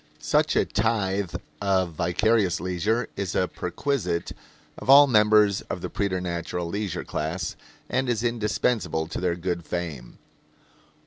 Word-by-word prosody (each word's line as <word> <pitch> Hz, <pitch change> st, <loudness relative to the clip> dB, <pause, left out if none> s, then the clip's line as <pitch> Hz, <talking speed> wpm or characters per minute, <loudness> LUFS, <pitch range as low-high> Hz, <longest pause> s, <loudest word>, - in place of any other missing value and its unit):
Such -, -, +1 dB
a -, -, +3 dB
tithe 100 Hz, -4 st, 0 dB, 0.3 s
of 95 Hz, -3 st, +1 dB
vicarious 90 Hz, +3 st, +1 dB
leisure 95 Hz, +7 st, -1 dB
is 100 Hz, -3 st, -3 dB
a 90 Hz, -, +2 dB
perquisite 90 Hz, -, -2 dB, 0.5 s
of -, -, -8 dB
all 140 Hz, +1 st, +10 dB
members 105 Hz, -4 st, +4 dB
of -, -, -4 dB
the -, -, -5 dB
preternatural 90 Hz, -3 st, -2 dB
leisure 100 Hz, +2 st, -3 dB
class 80 Hz, +4 st, -3 dB, 0.3 s
and 130 Hz, 0 st, 0 dB
is 115 Hz, -1 st, 0 dB
indispensable 110 Hz, -7 st, 0 dB
to 80 Hz, -, -5 dB
their 90 Hz, -2 st, +1 dB
good 85 Hz, 0 st, -3 dB
fame. 80 Hz, -8 st, -5 dB
95 Hz, 130 wpm, -25 LUFS, 85-110 Hz, 0.5 s, all